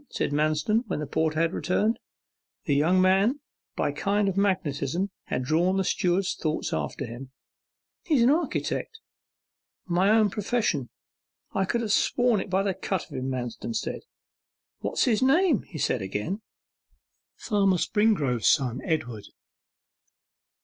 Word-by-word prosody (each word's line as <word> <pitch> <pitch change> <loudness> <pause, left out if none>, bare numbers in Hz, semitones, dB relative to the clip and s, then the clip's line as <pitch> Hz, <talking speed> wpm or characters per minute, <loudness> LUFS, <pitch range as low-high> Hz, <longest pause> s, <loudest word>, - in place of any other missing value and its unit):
said - - -2
Manston, 155 +10 +1
when - - -2
the 150 - -3
porter 155 +2 0
had 165 +1 +1
returned. 215 +5 0 0.7
The 145 - +1
young 160 +6 +3
man, 195 +9 +3 0.4
by - - 0
a - - -4
kind 200 +6 0
of 195 - -1
magnetism, 180 -2 0
had 130 - -2
drawn 170 +7 +2
the 190 - +2
steward's 180 +1 +1
thoughts 155 -1 -2
after 140 - -3
him. 120 +3 -8 0.8
'He's 300 -9 +3
an 250 - +5
architect.' 350 +7 -1 0.9
'My 185 +2 +2
own 220 +1 +5
old 205 - +1
profession. 205 - -1 0.6
I 195 -1 +1
could 235 +5 -1
have 220 -3 -2
sworn 245 -4 +2
it - - -7
by 190 +1 +1
the 195 -1 0
cut 190 -1 -3
of - - -16
him,' 130 0 -3
Manston 130 - -4
murmured. - - -4 0.8
'What's - - 0
his 235 -3 +2
name?' 290 - +3
he 170 - -8
said 125 -4 0
again. 105 - -3 1.0
'Springrove - - -19
Farmer 195 -4 +3
Springrove's 155 - +1
son, 125 +2 +2
Edward. 120 - -3
185 Hz, 150 wpm, -26 LUFS, 145-210 Hz, 1.0 s, an